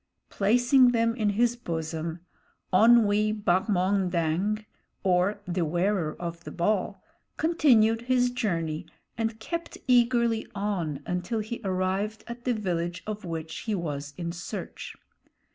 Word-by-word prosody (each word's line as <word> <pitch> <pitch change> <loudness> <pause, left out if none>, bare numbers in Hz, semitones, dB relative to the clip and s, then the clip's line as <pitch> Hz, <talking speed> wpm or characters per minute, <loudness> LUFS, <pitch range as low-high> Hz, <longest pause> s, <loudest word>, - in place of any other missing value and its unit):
Placing 245 +5 +4
them 230 0 +2
in 215 -4 +1
his 235 +4 +2
bosom, 165 -5 -4 0.5
Onwee 215 0 +5
Bahmondang, 185 +1 +1 0.4
or 190 +2 +2
The 180 -1 -1
Wearer 175 0 0
of 170 -1 -5
the - - -7
Ball, 195 +1 0 0.4
continued 240 -9 +4
his 250 0 +2
journey 165 -10 -2 0.3
and 225 -1 -2
kept 335 +9 -5
eagerly 235 -2 +3
on 175 -8 -2
until 180 +6 -2
he 220 +2 -4
arrived 190 +3 -1
at 235 +1 -9
the 250 - +2
village 175 -4 -2
of 215 -2 -5
which 160 -1 -5
he 220 -2 -2
was 145 -5 -4
in 170 -1 -3
search. 170 0 -7
205 Hz, 125 wpm, -27 LUFS, 175-230 Hz, 0.5 s, Onwee